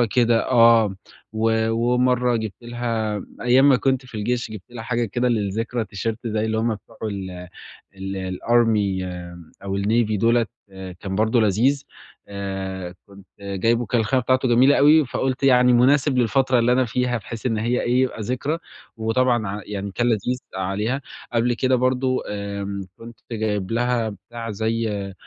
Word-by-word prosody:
كده 120 -2 +3
آه، 115 -4 +5 0.4
و 110 0 +1
ومَرّة 125 +1 +2
جبت 110 -3 -3
لها، 115 -3 -2 0.2
أيام 130 +3 +5
ما 130 - +5
كنت 130 0 0
في 125 - -12
الجيش، 120 +1 -2
جبت 110 - -7
لها 115 -2 -7
حاجة 120 0 -1
كده 120 +4 -1
للذكرى 115 +1 -1
تيشيرت 115 +3 -4
زي 110 0 -1
اللي 110 0 -1
هُم 110 0 0
بتوع 110 +2 -18
ال 95 -4 -5 0.5
الarmy 95 +1 0 0.6
أو 100 0 -3
الnavy 110 +1 +1
دُولَة 115 +1 +3 0.5
كان 95 -1 -4
برضه 110 +3 +2
لذيذ. 120 +8 +2 0.4
آآ، 95 -2 -5
كنت 100 -1 -16
جايبه 115 +5 0
كان 120 +3 0
الخامة 130 +4 +1
بتاعته 130 +1 +2
جميلة 125 +4 +5
أوي، 150 +1 +6
فقُلت 130 +1 -2
يعني 125 -2 +5
مناسب 130 +3 +3
للفترة 125 +1 +2
اللي 115 +1 +3
أنا 130 +1 +3
فيها 125 +1 -1
بحيث 115 +2 -8
إن 115 -3 +1
هي 120 +3 0
إيه، 125 +2 +2
يبقى 130 -3 -1
ذكرى 130 +8 -2 0.4
وطبعًا 120 0 +1
ع 100 +2 -4
يعني 100 -1 -5
كان 120 +4 0
لذيذ 120 +2 0 0.2
عليها. 105 +8 -2 0.3
قبل 120 +1 +2
كده 130 +2 +1
برضه 130 +1 +1
آمم، 100 -1 -4 0.2
كنت 115 0 -12
جايب 105 -3 -2
لها 120 -1 0
بتاع 115 +3 -8
زي 105 -2 -2
115 Hz, 155 wpm, -22 LUFS, 105-125 Hz, 0.6 s, أوي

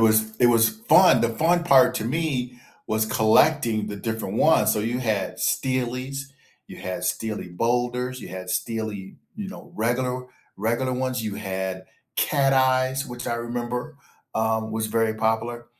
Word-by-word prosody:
was 110 0 +3
it 125 - +4
was 115 -1 +5
fun 200 - +5
the 115 - +2
fun 170 +8 +2
part 135 -6 +5
to 110 - -3
me 125 -3 -2 0.3
was 110 0 +1
collecting 110 0 +3
the 105 - -5
different 110 -1 -4
ones, 110 -9 +4
so - - -1
you 115 +4 -1
had 110 -6 -1
steelies, 130 +2 -1 0.4
you - - -10
had - - -5
steely 110 -4 -3
boulders, 125 +6 -1
you - - -9
had 95 0 -7
steely, 105 -2 -3 0.2
you 205 -2 -6
know, 200 - -11
regular 125 +3 -1 0.3
regular 120 +5 -1
ones, 130 -1 -2
you 105 -2 -3
had 95 -2 -4 0.3
cat 140 -2 +2
eyes, 130 0 +2
which 120 0 -7
I 120 - 0
remember, 120 +4 -4 0.4
um, 110 0 0
was 110 0 -1
very 110 0 +1
popular. 115 +2 -1
120 Hz, 155 wpm, -24 LUFS, 110-130 Hz, 0.4 s, was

